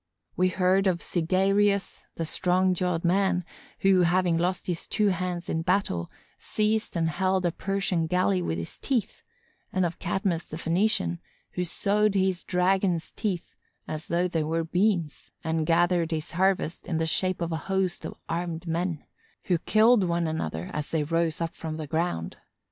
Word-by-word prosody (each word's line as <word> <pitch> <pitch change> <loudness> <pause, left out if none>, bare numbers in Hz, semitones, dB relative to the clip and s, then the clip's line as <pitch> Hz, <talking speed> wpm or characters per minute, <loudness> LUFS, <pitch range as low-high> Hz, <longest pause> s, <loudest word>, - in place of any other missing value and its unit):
We 185 0 +3
heard 185 +2 +2
of 180 -2 +2
Cynœgirus, 195 +3 +1
the 165 - -2
strong 185 +3 +2
jawed 180 -1 -1
man, 180 0 +2 0.4
who, 190 -1 +5
having 175 0 +3
lost 175 +2 0
his 175 -2 -3
two 210 -1 +2
hands 180 -2 -2
in 160 - -1
battle, 165 - 0 0.3
seized 215 -1 0
and 165 -1 +1
held 185 +3 +1
a 175 - +2
Persian 190 -3 -1
galley 100 - +2
with 85 -1 -2
his 85 0 -5
teeth, 235 -6 -1 0.5
and 185 -1 +1
of 170 0 -4
Cadmus 175 -1 -1
the 155 - -7
Phœnician, 165 - +1 0.3
who 180 - -2
sowed 205 +4 +1
a 190 -1 +3
dragon's 180 -1 +1
teeth 190 -5 -3 0.3
as 155 +1 -5
though 175 +1 +1
they 165 -3 -1
were 165 +2 0
beans 175 -2 0
and 160 -1 -1
gathered 175 0 +3
his 160 -1 -3
harvest 185 -1 0
in 165 - -1
the 160 - +1
shape 185 +3 0
of 170 -1 -2
a 160 - 0
host 190 -2 0
of - - -6
armed 170 0 -3
men, 170 -1 -2 0.4
who 175 -3 +1
killed 220 +3 +4
one 170 -1 0
another 85 - -3
as 150 -1 -3
they 160 -2 0
rose 165 +1 0
up 165 0 -2
from 160 -1 -5
the 155 - -4
ground. 155 - -2
175 Hz, 170 wpm, -27 LUFS, 165-190 Hz, 0.5 s, who